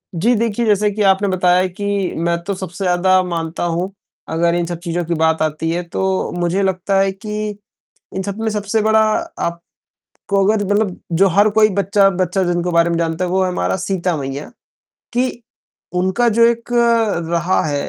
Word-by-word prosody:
जी 230 +9 +2
देखिए, 230 +1 0
जैसे 210 -1 +3
कि 210 +1 -4
आपने 195 +1 +3
बताया 180 0 +3
कि 185 +3 -7 0.3
मैं 170 +1 0
तो 200 - -2
सबसे 185 0 -6
ज़्यादा 185 +1 +3
मानता 170 -2 -3
हूँ 175 +3 -1 0.4
अगर 170 +1 +1
इन 175 -1 0
सब 170 0 -5
चीज़ों 175 0 -2
की 170 - -1
बात 160 0 +1
आती 155 +1 -1
है, 175 +1 -2
तो 190 +2 -2
मुझे 175 +3 0
लगता 190 +1 0
है 195 0 +2
कि 210 +2 -4 0.6
इन 190 - -3
सबमें 210 +3 -3
सबसे 210 +1 -1
बड़ा 220 +1 +3 0.4
आप 170 0 -2 0.7
को 195 0 +2
अगर 210 0 +2
मतलब 205 -1 0
जो 190 +4 +4
हर 200 +4 +4
कोई 215 +1 +4
बच्चा-बच्चा 195 -1 +2
जिनके 175 0 -1
बारे 170 0 +3
में 170 - 0
जानता 165 +1 -1
है 180 - -3
वो 190 +1 +2
है - - 0
हमारा 180 - -1
सीता 185 -2 -1
मैया, 140 0 -5 0.6
कि 245 0 -1 0.5
उनका 190 +7 +1
जो 230 +1 +4
एक 235 0 -1 0.6
रहा 170 +2 +1
है 145 -2 -2
185 Hz, 180 wpm, -18 LUFS, 170-205 Hz, 0.7 s, जो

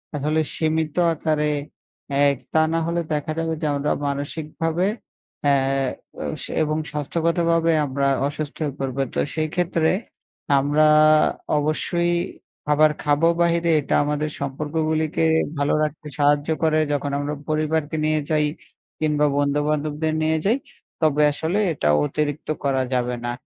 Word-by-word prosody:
আসলে 150 +2 0 0.2
সীমিত 160 -1 0 0.2
আকারে। 155 -1 0 0.8
এক 140 -1 +1 0.2
তা 160 - +4
না 165 - +2
হলে 170 0 0
দেখা 150 +1 -2
যাবে 165 0 -1
যে - - -1
আমরা 140 +1 0 0.2
মানসিকভাবে 160 +5 -2 0.6
আ - - +5 1.1
এবং 155 0 -1
স্বাস্থ্যগতভাবে 165 +2 +1
আমরা 140 0 0 0.2
অসুস্থ 150 0 -5
হয়ে 145 -3 -3
পড়ব। 135 -1 -3 0.2
তো - - 0
সেই 155 -1 0
ক্ষেত্রে 170 -2 +1 0.7
আমরা 145 +2 +3 0.7
অবশ্যই 170 +3 0 0.5
খাবার 150 +1 +4
খাবো 150 +2 +3
বাহিরে। 170 0 +2
এটা - - -1
আমাদের 150 +1 -1
সম্পর্কগুলিকে 155 +3 -1 0.3
ভালো 145 0 +1
রাখতে 150 0 -4
সাহায্য 145 +1 +3
করে, 155 -1 +3
যখন 145 0 -1
আমরা 145 +1 -2 0.2
পরিবারকে 155 0 0
নিয়ে 155 0 +2
যাই 155 -1 +2 0.5
কিংবা 150 -1 +2
বন্ধু-বান্ধবদের 150 +2 0
নিয়ে 160 0 +2
যাই। 225 +6 +3 0.4
তবে 150 -2 +3
আসলে, 160 +7 -1
এটা 75 - -2 0.2
অতিরিক্ত 150 - -2 0.2
করা 135 -2 +1
যাবে 125 -1 0
না। 120 - -1
155 Hz, 130 wpm, -22 LUFS, 145-160 Hz, 1.1 s, আ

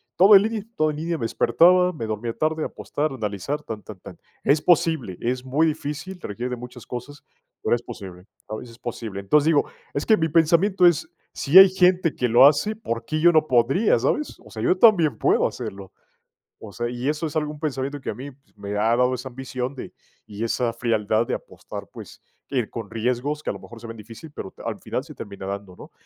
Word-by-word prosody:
todo 200 +3 +7
en 195 - +8
línea 220 0 -1
y - - -9
todo 155 0 +2
en - - -6
línea, 165 +2 -2
me 115 - -3
despertaba, 180 +9 +4
me 150 -10 -6
dormía 110 +2 -3
tarde, 155 +3 -1
apostar, 150 +1 -3
analizar, 110 +4 -3
tan, 110 -5 -6
tan, 105 -3 -11
tan. - - -12 0.3
Es 145 +2 +3
posible, 160 - +2
es 125 +1 -2
muy 140 +5 +2
difícil, 150 +4 -4
requiere 120 +5 -5
de - - -1
muchas 125 0 -11
cosas, 125 +4 -8 0.4
pero - - +2
es 120 - -5
posible, 95 -7 -10 0.2
¿sabes?, 110 +3 -7
es 115 +1 -16
posible. 115 -5 -6
Entonces 145 +10 +2
digo, 160 -3 +3 0.3
es 140 - -2
que 220 - +5
mi 160 -4 0
pensamiento 170 +4 +3
es: 160 -2 +3 0.2
"Si 150 +6 +3
hay 195 0 +11
gente 180 -3 +2
que 125 - 0
lo 120 +4 +7
hace, 150 +9 +4
¿por 115 - -4
qué 155 +7 -2
yo 175 +2 +6
no 155 -1 +3
podría, 135 - +3
sabes?", 300 - -1
o - - -14
sea, 110 +1 -7
yo 185 - +3
también 185 - +5
puedo - - +2
hacerlo, 95 -1 -7 0.7
o 110 - -10
sea, 120 +4 -3
y 120 +2 -4
eso 150 +2 -2
es 155 - -9
algún 150 -1 -2
pensamiento 140 -1 -3
que - - -5
a - - -2
mí, 135 +5 -8
pues, 135 -4 -29
me 100 0 -7
ha 110 +3 +2
dado 125 +1 +2
esa 130 +1 -5
ambición 130 +1 -5
de 130 - -8 0.3
y 105 +1 -6
esa 115 0 0
frialdad 110 -1 0
de - - -2
apostar, - - -9
pues, - - -12 0.3
ir 125 -5 -1
con 115 -3 -7
riesgos 125 +6 -2
que, - - -3
a - - -1
lo - - -9
mejor 115 0 -12
se 120 - -9
ven 115 0 -8
difícil, 115 +8 -11
pero 95 - -7
t - - -16
al - - -4
final - - -4
se - - -12
termina 100 -1 -8
dando, 100 -1 -6
¿no? - - -13
130 Hz, 225 wpm, -23 LUFS, 115-160 Hz, 0.7 s, hay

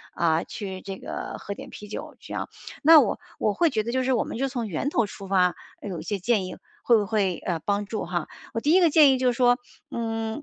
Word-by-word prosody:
呃， 165 -1 +2
去 190 -4 -6
这 195 -1 -6
个 - - -6
喝 200 - -5
点 - - -10
啤 210 - -10
酒 210 - -7
这 - - -10
样， - - -3 0.3
那 320 +1 +9
我 235 - +1 0.2
我 210 - +1
会 335 +9 +3
觉 220 -6 0
得 235 - -3
就 260 +1 +1
是 260 +1 +2
我 235 - +2
们 - - -6
就 270 - 0
从 245 -4 -3
源 195 - -2
头 240 -6 +2
出 195 -1 -9
发， 180 -2 +3 0.3
呃， 205 - -6
有 175 -4 -4
一 - - -7
些 200 +3 -2
建 205 0 +1
议 185 - -6 0.3
会 235 - +5
不 210 - 0
会， 200 -4 0
呃， 170 -2 -1
帮 205 +5 -1
助 215 +1 -4
哈。 175 -1 -2 0.3
我 230 - -1
第 295 - +2
一 365 - +7
个 345 -3 +5
建 300 -2 +7
议 260 - +2
就 255 0 +1
是 - - -3
说， 245 0 +4 0.3
嗯， 225 +1 -3
215 Hz, 280 characters per minute, -25 LUFS, 195-250 Hz, 0.3 s, 那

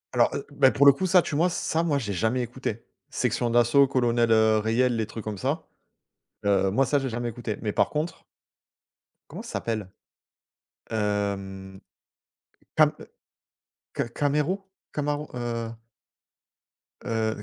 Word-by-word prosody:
Alors, - - +5
heu, - - -4
beh 135 -2 +5
pour 140 +6 +3
le 140 - +11
coup, 185 +7 -2
ça 180 0 +6
tu 145 - -4
mois 170 +4 +3
ç - - -5
ça, 160 - 0
moi, 150 -4 +1
j'ai 105 -7 -3
jamais 110 +6 0
écouté. 120 -2 -5 0.2
Sexion 120 - 0
d'Assaut, 120 +4 +5
Colonel, 120 -3 +2
heu, 110 -1 +4
Reyel, 120 +3 +1
les 110 -1 -1
trucs 110 - -7
comme 105 -3 -5
ça. - - -2 0.8
Heu, 95 -1 +2
moi, 135 +6 +3
ça, 145 - +2
j'ai 135 -1 -1
jamais 120 +1 -3
écouté. 115 -2 -5
Mais 105 -2 -1
par - - +2
contre 155 +2 -3 1.1
comment - - -7
ça - - -9
s'appelle? 110 -5 -3 1.0
Hem, 100 -2 -2 1.0
Cam, - - +5
heu, - - -10 0.9
Ca - - -1
Camerou? 150 +9 -1 0.2
Camarou, 150 0 -2
heu 115 -1 -4 1.3
Heu, 110 -1 -1
115 Hz, 150 wpm, -26 LUFS, 110-140 Hz, 1.3 s, le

